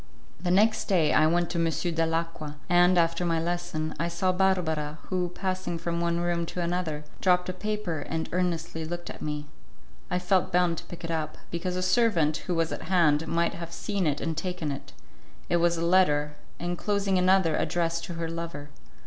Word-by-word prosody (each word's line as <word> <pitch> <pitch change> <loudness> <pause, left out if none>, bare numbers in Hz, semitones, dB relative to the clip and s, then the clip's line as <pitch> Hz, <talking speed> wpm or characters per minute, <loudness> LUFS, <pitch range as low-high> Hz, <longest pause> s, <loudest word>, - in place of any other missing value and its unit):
The 180 - -1
next 210 +5 +3
day 175 -7 +3
I 155 - +5
went 175 +1 +1
to 170 - -1
M. 165 - +3
Dalacqua, 165 -1 -1
and, 175 +1 +5
after 165 +1 +2
my 165 -2 +1
lesson, 165 -2 -2
I 170 - +1
saw 175 +2 +1
Barbara 170 -5 +1
who, 180 -2 0
passing 185 -1 -3
from 170 0 -2
one 170 0 0
room 170 -1 0
to 180 - -5
another, 170 -3 -1 0.2
dropped 180 -1 +3
a - - -2
paper 210 -4 -3
and 160 +2 -3
earnestly 170 -2 -1
looked 175 +2 -5
at - - -10
me. 150 -1 -3 0.6
I - - +1
felt 185 0 +1
bound 175 -2 +2
to - - -12
pick 175 - -10
it 165 - -3
up, 155 -2 -2
because 180 +2 -2
a 185 - -1
servant, 185 -6 +3
who 180 - 0
was 165 -1 +1
at - - -4
hand, 160 -4 +3
might 170 0 +1
have 170 -1 -7
seen 195 +1 -1
it 145 - 0
and 165 -1 -2
taken 175 -2 -3
it. 140 - -7 0.6
It 175 - +3
was 170 0 +2
a 165 - -1
letter, 150 -5 +3 0.3
enclosing 195 +2 0
another 185 -3 +4
addressed 165 0 0
to 175 - -6
her 165 0 -2
lover. 165 -3 -5
170 Hz, 190 wpm, -27 LUFS, 165-180 Hz, 0.6 s, I